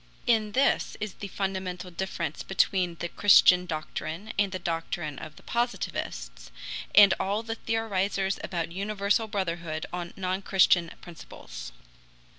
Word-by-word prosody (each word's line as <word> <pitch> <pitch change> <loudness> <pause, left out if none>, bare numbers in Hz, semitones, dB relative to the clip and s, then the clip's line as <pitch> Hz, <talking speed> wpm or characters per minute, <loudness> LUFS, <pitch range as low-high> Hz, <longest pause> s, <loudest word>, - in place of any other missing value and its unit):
In 220 -3 +2
this 270 +2 +2
is 210 -2 -4
the 200 - -7
fundamental 185 -2 -3
difference 170 -3 -3
between 185 -2 +1
the 175 - -4
Christian 180 -1 +6
doctrine 160 +4 -5
and 200 -2 +2
the 185 - -2
doctrine 165 -3 -3
of 155 -1 -9
the - - -16
Positivists, - - -3 0.5
and 200 -2 +9
all 205 +3 -1
the 225 0 -3
theorizers 200 -4 -1
about 170 -2 -3
universal 200 +3 0
brotherhood 170 -6 -3
on 175 -1 -4
non 185 0 -1
Christian 185 -3 +4
principles. 165 - -10
185 Hz, 130 wpm, -28 LUFS, 170-205 Hz, 0.5 s, and